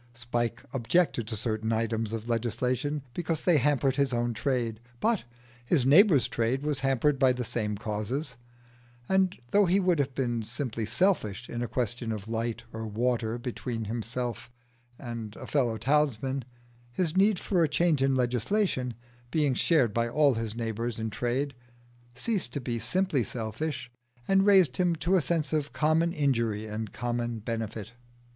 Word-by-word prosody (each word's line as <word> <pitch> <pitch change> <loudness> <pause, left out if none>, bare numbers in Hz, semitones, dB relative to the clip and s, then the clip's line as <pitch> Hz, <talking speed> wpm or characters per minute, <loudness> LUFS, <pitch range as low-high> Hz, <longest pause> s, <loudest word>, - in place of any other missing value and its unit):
Spike 120 0 -2
objected 125 -1 +1
to 110 -1 -3
certain 110 0 -1
items 115 -1 0
of 115 0 -4
legislation 125 +5 -1
because 165 -1 -2
they 170 -5 +4
hampered 135 0 +2
his 140 -2 +2
own 120 0 0
trade, 120 -4 -1 0.2
but 230 - +1 0.4
his 130 +1 +2
neighbours' 155 - +6
trade 120 +4 -1
was 150 -2 -1
hampered 135 +1 +2
by 130 -2 +5
the 125 0 -2
same 105 -3 -2
causes; 115 +6 -3 0.7
and 190 -1 +2
though 205 0 +5
he 185 +3 +4
would 180 -4 +2
have 135 -2 -1
been 120 -3 0
simply 115 -1 -4
selfish 125 - +1
in 120 - -4
a 120 - -1
question 120 -1 -2
of 105 -1 -5
light 115 0 -2
or 110 0 -4
water 115 +1 0
between 120 -1 -4
himself 120 +2 -3 0.5
and 115 -4 -6
a - - -8
fellow 120 -6 +1
townsman, 135 0 +1 0.5
his 165 +5 -1
need 200 +1 +4
for 180 -2 +1
a 155 - +2
change 155 -1 +2
in 135 0 +3
legislation, 125 - 0 0.3
being 145 -1 +2
shared 130 -4 +3
by 115 +1 +1
all 145 +1 +4
his 115 -2 -3
neighbours 115 0 -2
in 110 -1 -3
trade, 130 +5 -1 0.6
ceased 185 - -1
to - - -1
be 120 -3 -3
simply 180 - +1
selfish, 120 +5 -4 0.4
and 195 +1 +4
raised 185 -10 +5
him 175 -2 +2
to 170 +4 +1
a 185 - +4
sense 160 -1 -1
of 150 -1 -1
common 160 +2 +2
injury 115 -9 0
and 110 0 -5
common 120 -1 -2
benefit. 110 -1 -4
125 Hz, 160 wpm, -28 LUFS, 115-150 Hz, 0.7 s, neighbours